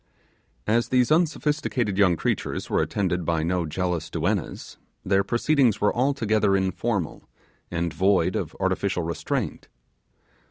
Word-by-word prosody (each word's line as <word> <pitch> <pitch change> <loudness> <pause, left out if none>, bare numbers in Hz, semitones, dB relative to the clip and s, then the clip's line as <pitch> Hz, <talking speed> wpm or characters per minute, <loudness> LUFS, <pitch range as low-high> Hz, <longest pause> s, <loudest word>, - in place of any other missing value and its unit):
As 115 +2 +1
these 125 +1 +2
unsophisticated 150 - +1
young 95 -3 +4
creatures - - -2
were - - +3
attended 90 -3 -1
by 80 -1 0
no 85 0 0
jealous 90 0 -2
duennas, - - -3 0.3
their 100 +1 +3
proceedings 120 +1 +2
were 105 - +1
altogether 110 -6 +2
informal, 95 -1 -2 0.4
and 85 -1 -2
void 95 +3 +2
of - - -3
artificial 90 - 0
restraint. 85 +1 -3
100 Hz, 120 wpm, -25 LUFS, 90-120 Hz, 0.4 s, young